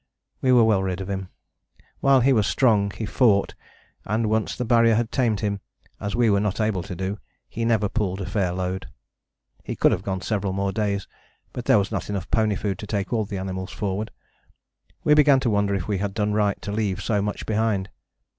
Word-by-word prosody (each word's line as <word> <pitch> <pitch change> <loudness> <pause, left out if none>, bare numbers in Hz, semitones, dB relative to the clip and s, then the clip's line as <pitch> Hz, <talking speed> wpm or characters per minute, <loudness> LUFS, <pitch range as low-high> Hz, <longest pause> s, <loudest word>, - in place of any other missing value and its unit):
We 130 - +3
were 125 -2 +6
well 110 -4 +3
rid 95 -1 -2
of 95 +1 -5
him: 95 -1 -4 0.7
while 135 -1 +4
he 135 +3 +4
was 110 -5 +2
strong 105 -6 +3
he 110 +2 -5
fought, 105 -2 +2 0.5
and 110 +1 -1
once 110 -1 0
the 125 - -3
Barrier 115 -1 +4
had 115 0 0
tamed 115 -5 +1
him, 100 -2 -1 0.4
as 100 -1 -3
we 120 -1 +3
were 100 -2 +3
not 105 0 -1
able 105 -4 0
to 90 +1 -7
do, 95 +3 -3 0.3
he 115 - -3
never 110 -3 +2
pulled 100 -4 -2
a 95 - -3
fair 95 -1 0
load. 95 +1 -3 0.8
He - - -5
could - - +4
have - - 0
gone 95 -1 -3
several 100 -3 -1
more 100 0 -1
days, 100 -2 -1 0.5
but 125 - -5
there - - +5
was 100 +1 0
not 100 -3 -3
enough 100 -2 -4
pony 110 -2 +2
food 100 -2 -3
to 105 - -7
take 100 +1 -2
all 110 -2 +1
the 100 -1 -5
animals 95 0 -4
forward. 100 +1 -3 0.9
We 150 - +5
began 145 -2 +6
to 120 - +1
wonder 100 -1 +1
if 90 -3 -3
we 100 -3 -1
had 100 0 -3
done 105 -1 0
right 105 -1 +1
to 100 - -4
leave 105 -3 -1
so 105 -2 +1
much 105 +1 -3
behind. 105 -3 0
105 Hz, 215 wpm, -24 LUFS, 95-110 Hz, 0.9 s, were